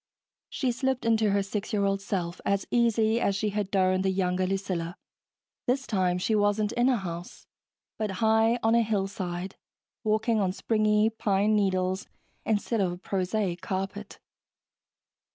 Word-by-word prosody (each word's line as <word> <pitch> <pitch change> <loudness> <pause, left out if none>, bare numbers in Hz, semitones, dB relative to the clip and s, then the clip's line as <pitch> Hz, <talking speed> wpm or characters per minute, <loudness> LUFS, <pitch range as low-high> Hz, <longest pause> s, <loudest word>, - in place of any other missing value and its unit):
She 260 -4 -1
slipped 260 +1 -1
into 220 -2 +3
her 200 0 +2
six 200 +1 -4
year 200 -2 +1
old 195 0 0
self 180 -3 -3
as 200 0 0
easily 230 -1 +2
as 200 - +1
she 210 +2 0
had 205 -1 -2
donned 185 -1 +2
the 190 - +2
younger 185 -1 0
Lucilla. 185 -2 -3 0.7
This 265 +2 +1
time 185 -4 +1
she 185 +5 0
wasn't 205 0 +2
in 240 +2 +2
a 255 - +3
house, 175 -3 -7 0.5
but 210 -3 -1
high 220 +3 +3
on 225 +1 +3
a 235 - +5
hillside, 195 -4 -3 0.5
walking 220 +1 +1
on 190 -2 +1
springy 215 +1 +2
pine 210 -1 +1
needles 190 -2 0 0.4
instead 220 +1 +1
of 175 -1 -2
prosaic 190 -2 -1
carpet. 195 +2 -4
200 Hz, 150 wpm, -27 LUFS, 190-220 Hz, 0.7 s, a